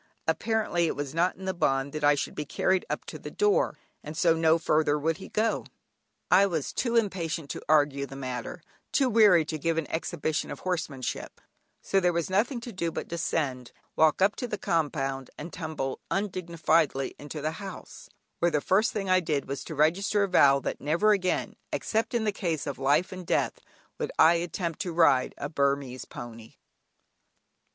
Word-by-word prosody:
Apparently 215 -7 +1
it - - -2
was 145 -1 -4
not 170 +3 +1
in 190 - -9
the 190 - -1
bond 135 -5 0
that 155 -1 -4
I 145 0 +5
should 140 - -3
be 150 - -3
carried 185 +5 0
up - - -3
to - - -8
the - - -7
door, 420 +4 +1 0.3
and 155 +1 -7
so 170 -2 +4
no 160 0 +3
further 155 -2 +2
would 160 +2 0
he 190 - -10
go. 220 +1 0 0.7
I 200 - +6
was 160 -7 -3
too 235 -2 -1
impatient 170 -8 -1
to - - -6
argue 145 -2 +3
the 135 - -10
matter, 130 +4 -5 0.3
too 265 -3 +2
weary 205 -7 +6
to 155 0 -4
give 165 +2 0
an 165 - 0
exhibition 160 -2 -2
of - - -7
horsemanship, 160 -8 -3 0.4
so 195 - +2
there 180 -1 +2
was 170 +2 -1
nothing 230 +6 +1
to 240 - -7
do 170 -3 -2
but - - -5
descend, 140 -7 -2 0.2
walk 160 +3 +4
up 200 +2 +3
the 240 -5 -3
compound, 135 -6 -1
and 165 +3 -8
tumble 155 -5 -4
undignifiedly 170 -7 0
into 145 +1 -7
the 155 +2 -1
house, 195 -1 -9 0.3
where 175 - +3
the 150 -3 +1
first 210 - +2
thing 200 -2 -2
I 185 0 +5
did 155 -5 -2
was 140 +1 -4
to 160 - -6
register 185 +7 +2
a - - +1
vow 140 -7 +5
that - - -4
never 170 +9 +3
again, 185 -3 0 0.2
except 225 +2 -1
in 225 -2 +1
a 210 - +2
case 170 -7 -2
of 140 -3 -5
life 145 +6 +2
and 185 -1 -7
death, - - 0 0.4
would - - -2
I 160 +1 +7
attempt 170 -1 -3
to 175 - -3
ride 145 -6 +3
a 140 - -3
Burmese 140 -3 -1
pony. 115 -2 -10
165 Hz, 190 wpm, -28 LUFS, 145-185 Hz, 0.7 s, I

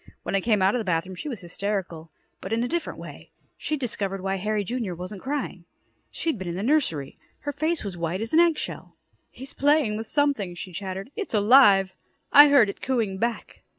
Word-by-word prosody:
When - - -4
I 195 - +2
came 210 -2 +2
out 190 +2 +4
of 250 - 0
the - - -2
bathroom, 180 -1 -1
she 185 +11 -6
was 230 -8 -6
hysterical 175 -3 -4 0.3
but 190 - -7
in 230 +1 +1
a - - -1
different 340 +4 -3
way. - - -11 0.3
She'd 305 -1 -3
discovered 200 -6 -3
why 195 +1 -2
Harry, 210 +2 -1
Jr., 225 -4 -3
wasn't 185 +3 -7
crying. 270 -11 -4 0.4
She'd 320 -10 -3
been 190 - -5
in 170 - -3
the 190 - -3
nursery. 220 - 0 0.2
Her 290 - -3
face 315 +3 -1
was 200 -4 -5
white 170 +2 -2
as 225 +4 -4
an 320 - +6
egg 340 -2 +4
shell. - - -6 0.3
"He's 265 +1 -11
playing 285 -7 +2
with 225 0 -5
something," 275 -12 0
she 180 +1 -8
chattered. 190 +5 -6
"It's 410 - -4
alive. 205 -4 +6 0.4
I 290 +1 +10
heard 280 -6 +6
it 200 - -7
cooing 225 -7 -1
back." 235 +1 -3
210 Hz, 210 wpm, -25 LUFS, 190-270 Hz, 0.4 s, I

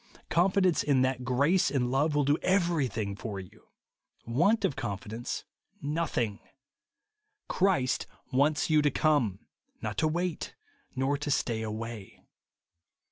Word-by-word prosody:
Confidence 185 0 +3
in 135 -3 +3
that 130 -1 0
grace 140 +9 +3
and 125 -3 0
love 145 +3 +2
will 145 - +3
do 145 +2 +3
evevythmg 140 - 0
for 105 -4 -4
you; 95 -2 -13 0.6
v^^ant 180 - +3
of 135 - 0
confidence, 110 -1 -4 0.4
nothing. 145 -8 -1 1.1
Christ 160 -10 +1 0.3
wants 145 +4 +3
you 155 -1 +4
to 145 - +3
come; 135 -10 +1 0.3
not - - -3
to 155 - +3
wait, 175 +1 -2 0.4
nor 135 +2 +1
to 145 - -3
stay 115 -5 0
away. 110 -1 -6
135 Hz, 125 wpm, -29 LUFS, 115-155 Hz, 1.1 s, you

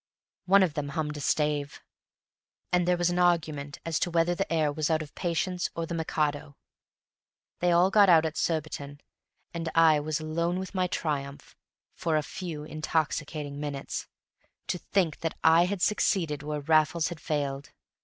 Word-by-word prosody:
One 195 +1 +6
of 170 -5 0
them 150 -2 -3
hummed 150 +1 -3
a - - -5
stave, 150 0 0 0.9
and 180 -1 +3
there 180 0 +3
was 175 0 +1
an 175 - -1
argument 155 -5 +1
as 165 -2 -1
to - - 0
whether 170 +1 +2
the 195 +1 -3
air 155 -3 +2
was 150 +1 -1
out 155 -1 +1
of 145 - -13
"Patience" 180 +1 -1
or 165 - -2
the 165 - -6
"Mikado." 150 -3 -2 1.0
They 175 0 +2
all 175 +3 +4
got 205 -1 +6
out 165 -2 +6
at 160 0 -3
Surbiton, 145 -3 -3 0.5
and 165 -1 -3
I 160 -2 +6
was 155 +1 -2
alone 170 +3 -1
with 190 +1 -5
my 185 -1 +1
triumph 145 -5 -4 0.4
for 160 -2 0
a 155 - 0
few 160 -2 -6
intoxicating 155 -2 -2
minutes. 145 -2 -4 0.6
To 180 - -1
think 170 -3 0
that 165 - -3
I 165 +2 +6
had 185 0 -2
succeeded 170 -7 +1
where 150 0 -4
Raffles 155 +2 +2
had 170 -3 -7
failed! 140 -3 -3
160 Hz, 170 wpm, -28 LUFS, 150-175 Hz, 1.0 s, One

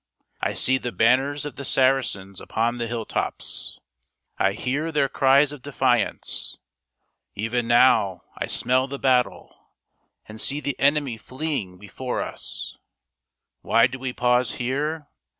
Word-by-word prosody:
I - - -1
see 130 0 +3
the 125 - -4
banners 135 +6 +2
of 145 - -7
the 140 - -5
Saracens 130 -9 +1
upon 115 +2 -1
the 115 - -2
hill 115 -1 -3
tops. - - -4 0.6
I 95 - +3
hear 140 +9 -2
their 145 -3 +2
cries 135 +2 +4
of 145 -3 -9
defiance. 125 -5 0 0.8
Even 115 +3 -1
now 120 -7 +4
I - - -3
smell 130 +1 +2
the 140 +1 -5
battle, 125 -2 +1 0.7
and 110 0 -9
see 140 +2 0
the 140 -3 -3
enemy 140 -4 +2
fleeing 130 - -3
before 125 +6 -5
us. - - -5 0.8
Why 115 - +4
do 130 +2 -3
we 130 0 -3
pause 125 0 +1
here 145 +5 -2
130 Hz, 135 wpm, -24 LUFS, 115-140 Hz, 0.8 s, cries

